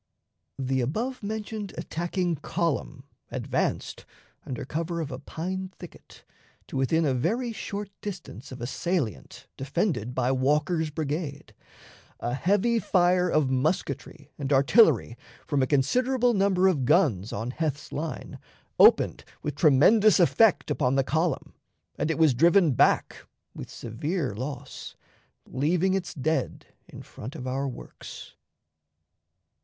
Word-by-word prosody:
The 130 Hz, -1 st, 0 dB
above 230 Hz, -, -2 dB
mentioned 210 Hz, -1 st, -5 dB
attacking 175 Hz, 0 st, -2 dB
column 150 Hz, -3 st, -2 dB, 0.3 s
advanced, -, -, -2 dB, 0.4 s
under 125 Hz, -, -4 dB
cover 165 Hz, +4 st, -3 dB
of 155 Hz, -3 st, -4 dB
a -, -, -5 dB
pine 185 Hz, +3 st, -5 dB
thicket, 175 Hz, -, -14 dB, 0.4 s
to -, -, -10 dB
within 155 Hz, +5 st, +2 dB
a 135 Hz, -, +2 dB
very 230 Hz, -, -1 dB
short 205 Hz, -2 st, -5 dB
distance 175 Hz, -, -8 dB
of 130 Hz, -, -8 dB
a -, -, -2 dB
salient 150 Hz, -, -3 dB
defended 135 Hz, -, -1 dB
by 130 Hz, 0 st, +1 dB
Walker's 150 Hz, +5 st, +1 dB
brigade. 150 Hz, -1 st, -4 dB, 0.7 s
A 120 Hz, -, -2 dB
heavy 205 Hz, -, +2 dB
fire 180 Hz, -3 st, +3 dB
of 150 Hz, -5 st, +2 dB
musketry 145 Hz, +1 st, -2 dB
and 140 Hz, -1 st, -3 dB
artillery, 140 Hz, -, +4 dB, 0.3 s
from 145 Hz, -3 st, 0 dB
a 130 Hz, -, +2 dB
considerable 245 Hz, -, +2 dB
number 190 Hz, -2 st, +3 dB
of 160 Hz, -8 st, +1 dB
guns 125 Hz, -, +2 dB
on 115 Hz, +4 st, -3 dB
Heth's 150 Hz, 0 st, -3 dB
line, 155 Hz, +1 st, -5 dB, 0.4 s
opened -, -, +5 dB, 0.2 s
with 150 Hz, -, -2 dB
tremendous 175 Hz, -, +5 dB
effect 200 Hz, +4 st, +4 dB
upon 130 Hz, -2 st, +1 dB
the 135 Hz, -, +3 dB
column, 160 Hz, +5 st, -1 dB, 0.5 s
and -, -, 0 dB
it 160 Hz, -, 0 dB
was 160 Hz, -4 st, +5 dB
driven 170 Hz, +5 st, +4 dB
back 120 Hz, -, +2 dB, 0.3 s
with -, -, -8 dB
severe 135 Hz, -, -3 dB
loss, 130 Hz, +6 st, -7 dB, 0.5 s
leaving 170 Hz, +8 st, +1 dB
its 185 Hz, -2 st, -3 dB
dead 155 Hz, +3 st, -2 dB, 0.2 s
in -, -, -11 dB
front 125 Hz, +6 st, -9 dB
of 125 Hz, -, -7 dB
our 135 Hz, +2 st, -2 dB
works. 125 Hz, -, -10 dB
155 Hz, 130 wpm, -27 LUFS, 135-185 Hz, 0.7 s, opened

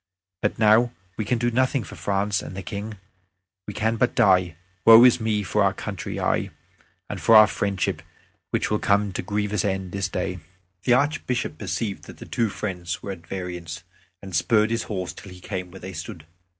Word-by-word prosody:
But 105 Hz, -, 0 dB
now 110 Hz, +2 st, +4 dB, 0.2 s
we 110 Hz, -, -3 dB
can 120 Hz, -, +1 dB
do 120 Hz, +1 st, 0 dB
nothing 130 Hz, +1 st, +1 dB
for -, -, -11 dB
France 100 Hz, 0 st, 0 dB
and 95 Hz, -, -8 dB
the 95 Hz, -, -5 dB
King. 105 Hz, +1 st, -6 dB, 0.7 s
We 105 Hz, -, -6 dB
can 110 Hz, +1 st, 0 dB
but 125 Hz, +3 st, +1 dB
die. 95 Hz, -8 st, +4 dB, 0.3 s
Woe 115 Hz, +1 st, +10 dB
is 125 Hz, -1 st, +6 dB
me 110 Hz, -2 st, 0 dB
for -, -, +1 dB
our -, -, +2 dB
country, -, -, -5 dB
aye, -, -, 0 dB, 0.6 s
and 100 Hz, -4 st, -6 dB
for 110 Hz, +8 st, +5 dB
our 110 Hz, 0 st, +10 dB
friendship, 100 Hz, -2 st, -2 dB, 0.5 s
which -, -, -1 dB
will 105 Hz, -, +2 dB
come 100 Hz, 0 st, +2 dB
to -, -, -2 dB
a -, -, -13 dB
grievous 105 Hz, +2 st, -1 dB
end 95 Hz, -3 st, -2 dB
this 100 Hz, -1 st, -2 dB
day." 90 Hz, 0 st, -3 dB, 0.5 s
The 120 Hz, -, +5 dB
Archbishop 140 Hz, -2 st, 0 dB
perceived 105 Hz, -4 st, -3 dB
that -, -, -12 dB
the -, -, -10 dB
two 115 Hz, -2 st, 0 dB
friends 95 Hz, -4 st, -4 dB
were 100 Hz, -, -4 dB
at 85 Hz, -3 st, -10 dB
variance, 85 Hz, -3 st, -6 dB, 0.4 s
and 95 Hz, -3 st, -6 dB
spurred 110 Hz, +6 st, +3 dB
his 115 Hz, 0 st, -1 dB
horse 95 Hz, -4 st, -3 dB
till 100 Hz, -, -12 dB
he 90 Hz, -, -12 dB
came 90 Hz, -1 st, -5 dB
where 95 Hz, +2 st, -12 dB
they 95 Hz, +1 st, -7 dB
stood. 85 Hz, 0 st, -8 dB
100 Hz, 200 wpm, -24 LUFS, 95-110 Hz, 0.7 s, Woe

